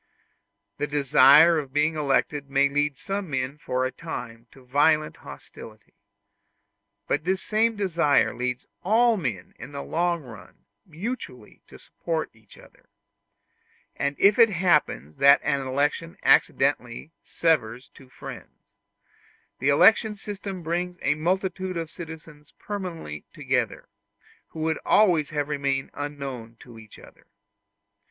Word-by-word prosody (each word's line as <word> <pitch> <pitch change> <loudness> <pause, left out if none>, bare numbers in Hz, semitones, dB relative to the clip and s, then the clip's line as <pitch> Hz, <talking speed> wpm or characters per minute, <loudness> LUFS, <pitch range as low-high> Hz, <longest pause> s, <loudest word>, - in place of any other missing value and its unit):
The 145 - -1
desire 145 +3 +6
of 140 -3 -7
being 150 +2 +1
elected 145 0 0
may 140 0 +3
lead 145 0 -1
some 195 +1 -4
men 135 +1 -3
for 130 -2 -1
a 130 - -2
time 120 -8 -8
to 130 -2 -19
violent 150 +4 +2
hostility; 110 0 -13 1.1
but 145 - 0
this 185 +2 -1
same 225 +1 +1
desire 170 -7 +2
leads 125 +1 -3 0.2
all 230 +4 +3
men 120 - -4
in 135 +4 -10
the 140 - -5
long 170 -1 -1
run 115 -5 -14 0.2
mutually 165 - -7
to - - -14
support 165 -2 -4
each 110 -2 -20
other; - - -20 1.1
and 140 0 -2
if 200 +4 +4
it 230 -1 +7
happens 150 - 0
that 140 +1 +6
an 140 -1 0
election 145 +5 -1
accidentally 135 +1 +2
severs 125 -7 -1
two 135 -2 -18
friends, - - -11 1.0
the 135 - +1
electoral 215 +8 +5
system 195 -3 -7
brings 175 +2 -3
a 145 - +3
multitude 185 +3 -2
of 165 -1 -5
citizens 160 -3 -11
permanently 175 - -6
together, - - -2 0.6
who 160 - -9
would 160 0 -1
always 175 -8 +3
have 145 -1 -2
remained 140 -2 -2
unknown 135 -6 -6
to 120 -3 -13
each 110 -1 -15
other. - - -18
150 Hz, 130 wpm, -25 LUFS, 135-175 Hz, 1.1 s, it